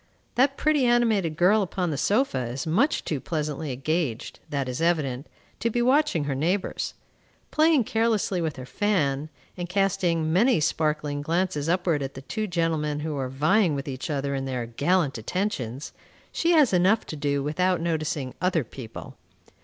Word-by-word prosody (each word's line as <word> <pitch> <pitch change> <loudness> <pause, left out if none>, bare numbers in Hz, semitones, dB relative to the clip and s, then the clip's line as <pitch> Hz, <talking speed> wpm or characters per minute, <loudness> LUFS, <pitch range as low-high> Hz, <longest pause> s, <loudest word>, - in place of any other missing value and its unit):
That 270 +3 +2
pretty, 305 -3 +2
animated 225 -10 +2
girl 195 +5 +4
upon 180 -2 -2
the - - -1
sofa 175 - +1
is 125 +3 -4
much 215 - +1
too 150 - -2
pleasantly 150 -1 -3
engaged, 135 -2 -2
that 140 -2 -2
is 125 +4 -4
evident, 150 -5 0 0.3
to 230 - 0
be 240 - -1
watching 255 - +3
her 145 -1 -2
neighbors. 175 +8 -1 0.6
Playing 310 -4 +4
carelessly 220 -5 0
with 160 -3 -2
her 130 -2 -8
fan, 150 -4 0 0.3
and 175 -1 -5
casting 180 -4 +1
many 230 +5 +4
sparkling 150 -2 0
glances 165 -1 -1
upward 175 -4 +1
at 135 0 -5
the 135 - -8
two 215 - -3
gentlemen 160 -4 -1
who 155 -1 -3
are 130 -2 -2
vying 155 +6 +2
with 140 +2 -4
each 135 +3 -5
other 140 -1 -1
in 135 -1 -2
their 125 -3 -3
gallant 145 +3 0
attentions, 135 - -3 0.4
she 335 - 0
has 295 - +5
enough 185 +5 +3
to - - -6
do 140 -1 -1
without 180 +5 +1
noticing 155 -5 -2
other 180 -4 +2
people. 115 0 -10
160 Hz, 165 wpm, -25 LUFS, 140-195 Hz, 0.6 s, has